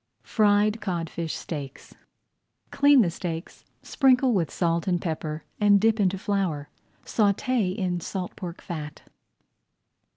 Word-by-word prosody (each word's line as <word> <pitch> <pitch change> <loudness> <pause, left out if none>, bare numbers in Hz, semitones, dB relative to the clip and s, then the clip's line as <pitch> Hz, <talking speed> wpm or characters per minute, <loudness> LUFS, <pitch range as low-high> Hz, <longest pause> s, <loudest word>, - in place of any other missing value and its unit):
FRIED 210 0 +2
CODFISH 170 -4 -3
STEAKS 140 -5 -7 0.8
Clean 285 -1 +5
the 175 - 0
steaks, 165 -1 -6 0.2
sprinkle 260 -2 +3
with 175 -7 +1
salt 170 -1 -1
and 175 -2 +1
pepper, 155 -2 -4 0.2
and 205 -1 +5
dip 220 +1 +2
into 195 -1 +2
flour. 185 -8 -2 0.4
Sauté 205 -1 +1
in 180 -3 -1
salt 180 +1 -5
pork 175 -2 -7
fat. 155 -4 -7
185 Hz, 120 wpm, -26 LUFS, 165-210 Hz, 0.8 s, Clean